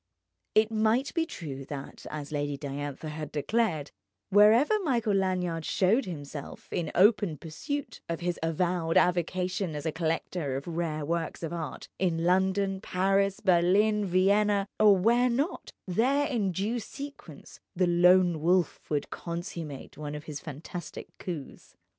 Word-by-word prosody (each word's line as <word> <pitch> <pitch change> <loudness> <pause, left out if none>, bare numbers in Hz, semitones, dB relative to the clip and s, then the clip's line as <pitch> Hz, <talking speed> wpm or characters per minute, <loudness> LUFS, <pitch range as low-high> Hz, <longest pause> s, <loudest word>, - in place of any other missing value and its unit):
It 215 +1 +4
might 225 +5 +1
be 330 -1 0
true 140 - -6
that, 140 -1 -8
as 150 -1 -6
Lady 145 -1 -2
Diantha 145 +2 -5
had 150 0 -6
declared, 155 -2 0 0.4
wherever 225 - +6
Michael 240 - +1
Lanyard 180 -4 0
showed 200 - +2
himself 145 -4 -7
in 165 -3 -2
open 200 -4 +4
pursuit 275 - -5
of 165 - -2
his 175 -1 -2
avowed 165 +1 0
avocation 180 0 +1
as 150 +1 -5
a 160 - +1
collector 160 -3 -2
of 135 - -4
rare 160 -3 -2
works 170 +1 -2
of 165 - -3
art—in 165 +1 -3
London, 190 +2 +2
Paris, 195 +1 +1
Berlin, 200 +3 +3
Vienna, 200 +2 +3
or 210 -2 +7
where 235 +6 +3
not—there 265 - 0
in 220 -9 0
due 210 +7 -1
sequence 275 - -10 0.2
the 180 +1 +3
Lone 175 -1 +4
Wolf 175 0 +1
would 145 -2 -1
consummate 170 -5 -6
one 150 -1 -5
of 150 - -7
his 150 -3 -6
fantastic 160 +4 -8
coups. 165 -7 -7
180 Hz, 135 wpm, -29 LUFS, 155-205 Hz, 0.4 s, or